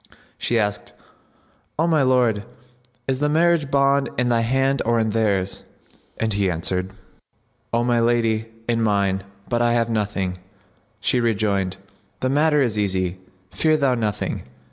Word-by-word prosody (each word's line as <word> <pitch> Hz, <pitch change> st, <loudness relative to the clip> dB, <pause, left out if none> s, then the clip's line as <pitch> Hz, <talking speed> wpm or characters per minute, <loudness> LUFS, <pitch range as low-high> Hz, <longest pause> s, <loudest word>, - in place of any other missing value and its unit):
She 120 Hz, -, 0 dB
asked, 105 Hz, -2 st, -2 dB, 0.8 s
"O 160 Hz, -, +2 dB
my 160 Hz, -3 st, +3 dB
lord, 125 Hz, -5 st, +2 dB, 0.6 s
is 130 Hz, -1 st, 0 dB
the 150 Hz, +1 st, +1 dB
marriage 165 Hz, -1 st, +2 dB
bond 140 Hz, 0 st, +2 dB
in 125 Hz, -1 st, +1 dB
thy 115 Hz, -1 st, +2 dB
hand 135 Hz, +3 st, +1 dB
or 115 Hz, 0 st, +1 dB
in 110 Hz, -1 st, +1 dB
theirs?"; 100 Hz, -4 st, 0 dB, 0.6 s
and 110 Hz, -1 st, 0 dB
he 100 Hz, -1 st, +1 dB
answered, 90 Hz, +2 st, -2 dB, 0.8 s
"O 120 Hz, 0 st, +1 dB
my 120 Hz, -1 st, +2 dB
lady, 115 Hz, -1 st, +1 dB, 0.2 s
in 115 Hz, -1 st, +1 dB
mine, 100 Hz, -3 st, +1 dB, 0.3 s
but 120 Hz, -1 st, 0 dB
I 120 Hz, 0 st, +3 dB
have 115 Hz, -1 st, +1 dB
nothing." 100 Hz, -4 st, -2 dB, 0.6 s
She 125 Hz, -, +2 dB
rejoined, 100 Hz, -5 st, 0 dB, 0.4 s
"The 130 Hz, -, +1 dB
matter 150 Hz, 0 st, +3 dB
is 110 Hz, -4 st, -1 dB
easy; 95 Hz, -2 st, -1 dB, 0.3 s
fear 155 Hz, -1 st, +2 dB
thou 140 Hz, -3 st, +2 dB
nothing. 110 Hz, -4 st, -2 dB
115 Hz, 145 wpm, -22 LUFS, 100-130 Hz, 0.8 s, my